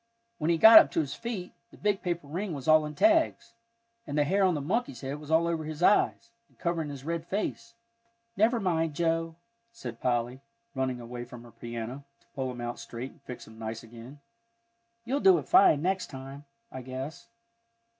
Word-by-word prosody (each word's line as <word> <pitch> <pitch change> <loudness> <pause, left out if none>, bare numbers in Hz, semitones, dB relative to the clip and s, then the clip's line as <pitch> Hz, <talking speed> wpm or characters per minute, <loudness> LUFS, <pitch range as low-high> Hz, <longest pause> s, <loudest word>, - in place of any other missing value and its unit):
When 155 +1 0
he 170 - +3
got 220 +6 +11
up - - +3
to - - +1
his 145 -3 -2
feet, 215 -7 -5 0.2
the - - -17
big 205 -2 0
paper 175 -3 -3
ring 175 +6 -4
was 135 0 -8
all 155 -1 +5
in 150 - -8
tags, 325 - +2 0.5
and 145 - -3
the 150 - +4
hair 195 +7 +2
on 185 -3 +3
the - - -2
monkey's 150 - -2
head 140 +2 -5
was 150 0 -11
all 160 +1 +4
over 165 -2 -1
his 155 +2 -5
eyes, 220 +3 +3 0.2
and - - -30
covering 170 -3 -2
his 140 -1 -8
red 165 0 -3
face. 215 +3 -3 0.6
"Never 225 +3 +3
mind, 165 -6 0
Joe," 165 0 0 0.4
said 120 - -8
Polly, 125 +1 -1 0.3
running 130 -2 -2
away 120 0 -7
from 120 0 -11
her 120 - -14
piano, 120 +3 -6 0.2
to - - -33
pull 130 -2 -3
him 125 -1 -7
out 120 0 -4
straight 120 +3 -7
and 155 - -24
fix 125 -2 -9
him 110 0 -15
nice 110 0 -5
again, 120 +5 -12 0.9
"you'll 265 +4 0
do 190 -8 +6
it 150 - -5
fine 145 0 +5
next 190 +1 0
time, 135 +1 -9 0.3
I 130 - -7
guess." 130 - -7
150 Hz, 200 wpm, -28 LUFS, 130-180 Hz, 0.9 s, got